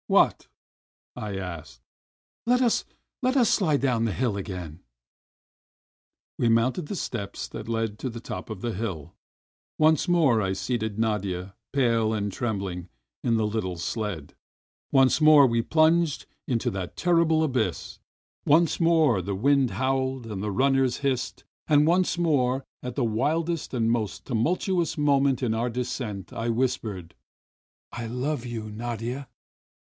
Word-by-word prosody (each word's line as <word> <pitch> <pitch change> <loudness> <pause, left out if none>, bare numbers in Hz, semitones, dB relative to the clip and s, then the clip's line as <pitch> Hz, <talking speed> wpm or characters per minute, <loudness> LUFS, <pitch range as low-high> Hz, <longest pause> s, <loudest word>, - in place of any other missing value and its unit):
"What?" - - +3 0.7
I 105 -2 -4
asked. 85 -10 -7 0.7
"Let 250 +2 +3
us 240 -3 +2 0.2
— - - -59
let 255 +2 +2
us 240 -4 +4
sUde 155 -8 +2
down 125 -4 +1
the 115 - 0
hill 120 0 -1
again!" 90 -4 -6 1.6
We 120 - +2
mounted 125 +8 +2
the 200 - -4
steps 100 -10 -4
that 110 0 -7
led 115 -2 -1
to 130 - -3
the 115 0 -7
top - - -7
of 110 -3 -6
the 115 +2 -3
hill. 95 -8 -5 0.6
Once 155 +2 +3
more 150 -11 +4
I 95 -1 0
seated 110 +1 -2
Nadia, 100 -4 -2 0.2
pale 115 -5 +2
and 105 -1 -1
trembhng, 95 -6 -3 0.3
in 115 -2 +2
the 110 -1 +1
little 105 -5 -2
sled, 95 -4 -4 0.6
once 135 +2 +4
more 155 -2 +8
we 115 -1 +1
plunged 160 +3 +2 0.2
into 120 -3 0
that 95 -2 -5
terrible 165 -2 +3
abyss; 125 - -1 0.4
once 165 +3 +3
more 160 - +4
the 100 +2 -3
wind 135 +4 +3
howled, 130 -1 -1
and 105 -3 -5
the 105 - -2
runners 135 +2 +2
hissed, 135 -3 -2 0.2
and 150 0 +4
once 180 +1 +2
more, 135 -6 +1 0.2
at 125 -1 -5
the 135 - +1
wildest 155 +9 -1
and 115 -2 +1
most 110 -4 -2
tumul 130 +9 +1
tuous 175 -4 -1
moment 140 -2 +2
of 120 -3 +1
our 115 +2 0
descent, 115 -6 -4
I 115 +1 -2
whispered: 115 -8 -2 0.8
"I 115 -1 -5
love 125 +2 -2
you, 115 -3 -5
Nadia!" 120 +4 -5
120 Hz, 150 wpm, -26 LUFS, 105-145 Hz, 1.6 s, more